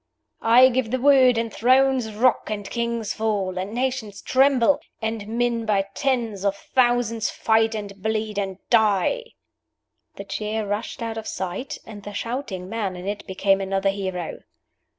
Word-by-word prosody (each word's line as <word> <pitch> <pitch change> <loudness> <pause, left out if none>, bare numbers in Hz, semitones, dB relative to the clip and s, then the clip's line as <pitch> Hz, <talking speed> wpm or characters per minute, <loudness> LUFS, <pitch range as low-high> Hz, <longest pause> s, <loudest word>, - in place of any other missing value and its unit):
"I 245 +3 +7
give 255 -2 -1
the 255 +2 -1
word, 260 -2 +5
and 230 -1 -2
thrones 255 -1 +3
rock, 245 +1 +2
and 205 -2 -4
kings 235 -1 -2
fall, 200 -4 -1
and 190 +2 -4
nations 245 -4 -3
tremble, 270 0 +4 0.2
and 220 -2 -3
men 235 +1 0
by 195 -2 +1
tens 235 -8 -1
of 200 -1 +1
thousands 240 -2 +1
fight 225 0 +2
and 200 -2 -7
bleed 215 0 -1
and 190 -2 -3
die!" 220 - +3 0.9
The 200 - -7
chair 210 +2 -3
rushed 205 +3 -4
out 225 -1 -3
of 220 - -8
sight, 190 +8 -4
and 210 -2 -10
the 205 +1 -8
shouting 220 -4 -4
man 205 -3 -3
in 180 +2 -7
it 205 0 -4
became 195 +1 +1
another 195 0 0
hero. 190 -3 -4
220 Hz, 155 wpm, -23 LUFS, 200-240 Hz, 0.9 s, I